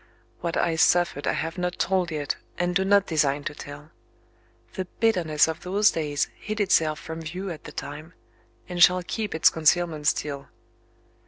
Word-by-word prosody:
What 170 -1 -2
I 165 -1 +1
suffered 175 -4 +2
I - - +2
have 165 +4 -3
not 180 0 -2
told 185 -2 +1
yet, 150 -3 -2 0.2
and 175 0 -1
do 190 - +3
not 200 0 +4
design 145 -3 +1
to 150 - -4
tell. 145 +1 -10 0.8
The 185 - -3
bitterness 175 -10 +3
of 160 0 -4
those 200 +3 +3
days 150 -3 -1
hid 215 0 -5
itself 160 -6 +2
from 160 0 -7
view 180 +4 -5
at 160 - -9
the - - -8
time 150 +4 -8 0.5
and 180 -1 -4
shall 180 +1 +6
keep 210 +2 -4
its 160 - +5
concealment 160 -1 +1
still. 140 -2 -1
165 Hz, 170 wpm, -25 LUFS, 150-180 Hz, 0.8 s, shall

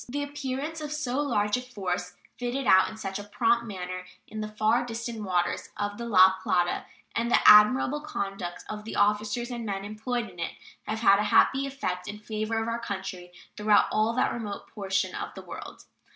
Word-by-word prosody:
The 285 +3 -2
appearance 285 +2 -4
of 300 -1 -5
so 285 -3 -2
large 215 -6 +1
a - - -4
force, 180 -7 -4 0.2
fitted 245 +2 -3
out 190 -3 +6
in 220 - -10
such 195 -2 -4
a - - -6
prompt 235 +3 +1
manner, 185 -2 -5 0.2
in 215 - -6
the 215 - -3
far 215 +3 +1
distant 230 -1 -5
waters 180 -3 -1
of 205 +1 -3
the 235 - -4
La 190 -3 +6
Plata, 175 -1 +1 0.3
and 235 +1 0
the - - +5
admirable 250 +7 +7
conduct 195 -10 -5
of 210 0 -6
the 220 - -6
officers 210 +4 +1
and 240 -1 -4
men 200 -2 -3
employed 230 +3 -3
in 180 -3 -14
it, 170 - -3 0.3
have 220 +1 -2
had 200 -3 +6
a 210 - +1
happy 270 +1 +4
effect 180 -10 -4
in 205 0 -5
favor 215 +1 -2
of 225 - -2
our 230 0 -1
country 190 -5 -6 0.2
throughout 210 -1 +4
all 215 +1 +2
that 255 - +1
remote 210 -4 -5
portion 195 -2 -2
of - - -5
the - - -8
world. - - -9
215 Hz, 195 wpm, -27 LUFS, 195-240 Hz, 0.3 s, admirable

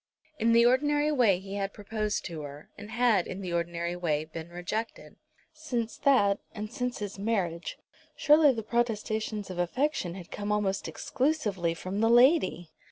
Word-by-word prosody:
In 230 +1 +3
the 235 0 +6
ordinary 290 +4 +3
way 235 -10 +4
he 195 +2 -7
had 195 0 -3
proposed 210 0 -3
to 165 -3 -5
her, 145 0 -10
and 210 - -10
had, 225 -5 +2
in 185 +2 -6
the 180 -2 -4
ordinary 170 0 -2
way, 155 -4 -1
been 160 +1 -8
rejected. 180 +6 -5 0.4
Since 250 -8 -3
that, 210 -8 +3 0.2
and 210 0 -5
since 250 -2 -2
his 205 -1 -6
marriage, 190 -6 -2 0.4
surely 300 -1 +6
the 225 -3 -4
protestations 220 -3 -2
of 180 - -6
affection 185 - -1
had 180 -3 -10
come 205 0 -3
almost 205 -2 0
exclusively 210 - -1
from 185 +4 -4
the 225 +1 +3
lady! 240 - +4
210 Hz, 165 wpm, -29 LUFS, 175-240 Hz, 0.4 s, the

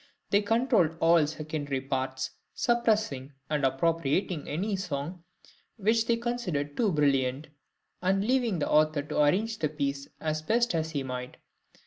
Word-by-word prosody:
They 205 - +5
controlled 215 - +2
all 165 -2 +5
secondary 150 -3 -3
parts, 130 -1 -3 0.2
suppressing 215 - +1 0.2
or 150 - +3
appropriating 150 +4 0
any 195 +8 -1
song 170 -1 -4 0.5
which 225 +2 +2
they 235 - +3
considered 185 -13 -2
too 220 -5 +2
brilliant, 140 -2 +1 0.5
and 195 +2 +1
leaving 245 -5 +2
the 150 - -1
author 155 -1 +3
to 150 0 0
arrange 215 +9 +1
the 155 - 0
piece 140 -2 -3
as 155 0 -2
best 235 +8 +2
he 160 -3 -1
might. 125 -1 -6
155 Hz, 135 wpm, -28 LUFS, 145-205 Hz, 0.5 s, They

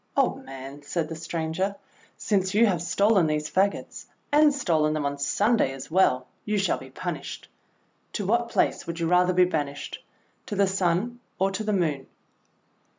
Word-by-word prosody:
:'Old - - +1
man," 135 +2 -9
said 155 +2 -2
the 165 - -5
stranger, 165 +4 -2 0.4
"since 195 -2 0
you 230 +2 +6
have 185 -7 +1
stolen 185 +1 +3
these 150 0 -1
fagots, 195 +2 -1 0.2
and 300 0 +6
stolen 160 - +1
them 155 -2 -1
on 140 0 -1
Sunday 205 - +2
as 135 +3 -9
well, 145 -8 +3 0.2
you 210 0 -1
shall 195 - +1
be - - -11
punished. - - -6 0.7
To 205 - -2
what 235 +4 +1
place - - 0
would 170 0 -4
you 165 - 0
rather 180 +1 +4
be 180 0 +5
banished? 145 -5 -4 0.4
To 215 - -3
the 200 0 +4
Sun, 190 +5 0 0.2
or 195 +1 +1
to 195 +3 -3
the 215 - -1
Moon?" 155 -8 0
180 Hz, 170 wpm, -26 LUFS, 155-200 Hz, 0.7 s, you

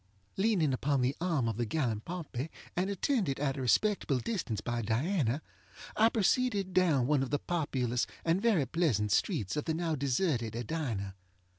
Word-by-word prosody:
Leaning 190 -9 +2
upon 135 +1 +1
the 130 +3 +1
arm 160 -9 +1
of 110 -2 -2
the 120 - 0
gallant 115 -6 -1
Pompey, 165 -5 -5 0.3
and 185 +3 0
attended 200 - 0
at 135 -2 0
a 135 - -4
respectable 150 - +2
distance 125 - -2
by 120 +1 -2
Diana, 130 - 0 0.5
I 225 +1 +5
proceeded 210 -3 +1
down 165 -9 +3
one 145 0 +2
of 135 - -2
the 145 - +1
populous 130 -8 -1 0.2
and 170 +3 +2
very 210 - +3
pleasant 125 - +1
streets 120 - +1
of 150 - -2
the 160 - 0
now 165 -1 -1
deserted 130 - 0
Edina. 115 -6 -3
145 Hz, 165 wpm, -31 LUFS, 120-180 Hz, 0.5 s, I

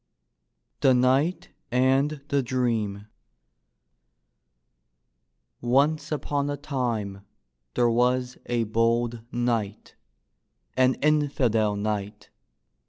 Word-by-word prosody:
THE 130 -1 +4
KNIGHT 135 +8 +2 0.2
AND 135 +4 +2
THE 140 -1 +2
DREAM 115 -5 -1 2.6
Once 140 +7 +1
upon 145 -1 -1
a 145 - -2
time 115 -9 -3 0.5
there 120 -1 +3
was 125 +1 +1
a 120 -1 0
bold 115 +1 0
knight, 115 -3 -2 0.8
an 130 0 +3
infidel 130 -8 +2
knight. 105 0 -4
125 Hz, 80 wpm, -26 LUFS, 115-135 Hz, 2.6 s, THE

